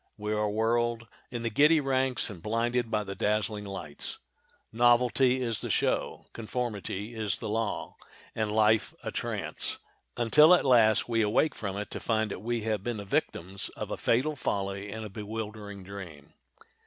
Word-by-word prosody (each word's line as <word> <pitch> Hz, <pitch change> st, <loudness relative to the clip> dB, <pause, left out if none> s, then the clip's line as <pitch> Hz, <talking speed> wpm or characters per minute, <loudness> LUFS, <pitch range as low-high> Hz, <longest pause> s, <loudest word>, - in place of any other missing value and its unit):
We 105 Hz, 0 st, -2 dB
are 105 Hz, 0 st, +1 dB
whirled 115 Hz, +2 st, 0 dB, 0.2 s
in 120 Hz, -1 st, -5 dB
the 115 Hz, -, -1 dB
giddy 150 Hz, +6 st, +5 dB
ranks 130 Hz, -4 st, 0 dB
and 90 Hz, -5 st, -10 dB
blinded 115 Hz, +3 st, 0 dB
by 105 Hz, -1 st, 0 dB
the 100 Hz, -1 st, -5 dB
dazzling 105 Hz, 0 st, -1 dB
lights. 95 Hz, -7 st, -6 dB, 0.5 s
Novelty 125 Hz, +2 st, +3 dB
is 115 Hz, -3 st, -1 dB
the -, -, -4 dB
show, -, -, 0 dB
conformity 110 Hz, -2 st, -4 dB
is 110 Hz, -3 st, -1 dB
the -, -, -6 dB
law—and 110 Hz, 0 st, -4 dB
life 110 Hz, 0 st, +3 dB
a -, -, -3 dB
trance, -, -, -2 dB, 0.4 s
until 150 Hz, +9 st, +7 dB
at -, -, 0 dB
last 115 Hz, -5 st, +5 dB
we 115 Hz, -1 st, +1 dB
awake 110 Hz, +9 st, +2 dB
from 100 Hz, -2 st, -5 dB
it 105 Hz, -, -5 dB
to -, -, -4 dB
find 110 Hz, -2 st, 0 dB
that -, -, -5 dB
we 120 Hz, +1 st, -1 dB
have 105 Hz, -2 st, -1 dB
been 120 Hz, -1 st, -2 dB
the 100 Hz, -, -6 dB
victims 95 Hz, 0 st, -2 dB
of -, -, -5 dB
a -, -, -1 dB
fatal 135 Hz, +6 st, +1 dB
folly 100 Hz, -5 st, -3 dB
and 110 Hz, +1 st, -5 dB
a -, -, -6 dB
bewildering 105 Hz, -1 st, -6 dB
dream. 90 Hz, -7 st, -10 dB
110 Hz, 165 wpm, -29 LUFS, 105-120 Hz, 0.5 s, until